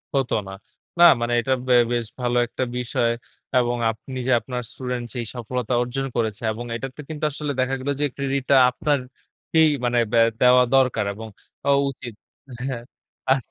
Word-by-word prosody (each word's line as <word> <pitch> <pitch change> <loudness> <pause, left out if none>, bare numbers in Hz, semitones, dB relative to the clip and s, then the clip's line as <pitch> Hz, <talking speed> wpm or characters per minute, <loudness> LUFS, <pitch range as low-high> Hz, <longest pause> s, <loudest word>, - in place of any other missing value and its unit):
হত 135 -2 0 0.2
না। 95 - -7 0.5
না - - +8 0.2
মানে 120 +1 0
এটা 130 +1 +1
বে 125 - +4 0.2
বেশ 120 -1 0
ভালো 120 0 0
একটা 130 - -3
বিষয় 120 -1 0 0.5
এবং 120 -1 +2
আপনি 130 +4 -9
যে - - +2
আপনার 125 0 -5
স্টুডেন্ট 125 -2 -4
যেই 120 -2 -3
সফলতা 125 +1 -3
অর্জন 130 +3 -2
করেছে 110 -2 -1
এবং 120 +2 -6
এটাতে 135 +4 -6
কিন্তু 155 -1 -6
আসলে 150 0 -3
দেখা 130 +1 +1
গেল 130 - -4
যে - - +3
ক্রেডিট 140 -1 -1
টা 140 - +6 0.2
আপনারকেই, 145 +3 0 0.2
মানে 120 0 +1
ব্যা 115 -1 +5 0.2
দেওয়া 125 0 +7
দরকার 130 -5 +3
এবং 110 +2 -8 0.4
অ - - +3 0.2
উচিত। 125 -3 -8 0.5
হ্যাঁ, 120 -3 -3 0.5
আচ্ছা। 135 - +6
125 Hz, 170 wpm, -23 LUFS, 120-135 Hz, 0.5 s, না